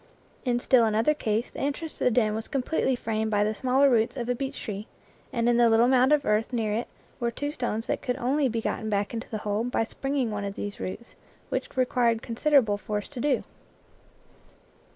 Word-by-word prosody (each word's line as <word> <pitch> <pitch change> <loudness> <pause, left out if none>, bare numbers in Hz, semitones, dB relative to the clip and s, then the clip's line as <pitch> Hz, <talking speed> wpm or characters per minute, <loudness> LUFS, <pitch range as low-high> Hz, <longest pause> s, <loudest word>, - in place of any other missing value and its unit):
In 245 -1 +2
still 245 -1 +4
another 220 +7 +2
case 225 -5 -1
the - - -8
entrance 290 +3 -3
to - - 0
the - - +6
den 220 -3 +2
was 220 +1 -4
completely 265 0 0
framed 220 -2 -2
by 205 -1 +2
the 215 +1 0
smaller 260 +5 +3
roots 235 0 +2
of 240 -2 -3
a - - +3
beech 265 +2 -4
tree, 210 0 -5 0.4
and 235 -3 0
in 240 -1 +4
the 240 -1 +5
little 225 +2 +5
mound 260 +1 +4
of 300 -1 +3
earth 215 +3 +1
near 225 -4 0
it 230 +3 -2 0.3
were 240 -1 0
two 285 +5 -3
stones 235 -5 -2
that - - -2
could 250 0 -2
only 275 +1 +1
be 230 0 -2
gotten 220 0 -2
back 205 0 -1
into 230 +1 -5
the 220 - -3
hole 210 +2 0
by 245 -1 0
springing 270 0 -2
one 205 -1 -3
of 200 0 -4
these 205 0 -5
roots, 235 +6 -6 0.4
which - - -4
required 245 -3 +2
considerable 235 -4 +2
force 210 0 -3
to 275 - -8
do. 270 -1 +1
235 Hz, 215 wpm, -27 LUFS, 220-260 Hz, 0.4 s, the